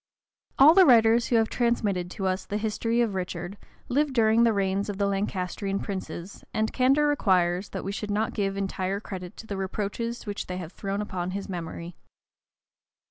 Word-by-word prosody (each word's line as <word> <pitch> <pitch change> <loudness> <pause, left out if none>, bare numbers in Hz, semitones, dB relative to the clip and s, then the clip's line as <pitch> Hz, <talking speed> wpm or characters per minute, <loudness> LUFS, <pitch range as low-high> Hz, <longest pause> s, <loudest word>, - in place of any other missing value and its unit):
All 290 +4 +8
the 375 -1 +7
writers 230 -1 +5
who 240 - +1
have 225 -1 +4
transmitted 210 -8 0
to 190 +1 -5
us 185 0 0
the 205 - -3
history 225 +2 0
of 225 -4 0
Richard, 180 0 -4 0.3
lived 280 +1 +1
during 225 -1 +4
the 235 -1 +5
reigns 200 0 0
of 200 - -4
the 200 - +1
Lancastrian 195 0 -2
princes, 190 -2 -6
and 220 0 0
candor 270 +3 +3
requires, 185 -9 +2
that - - -5
we 195 - -3
should 210 +1 -5
not 210 +2 0
give 195 -1 -1
entire 195 0 -2
credit 185 -4 -8
to - - -9
the 200 -3 -5
reproaches 210 +5 -3
which 205 -1 -4
they 180 - -4
have 175 -1 -7
thrown 200 0 -3
upon 180 -3 -4
his 200 - -6
memory. 170 -1 -6
200 Hz, 185 wpm, -26 LUFS, 190-225 Hz, 0.3 s, All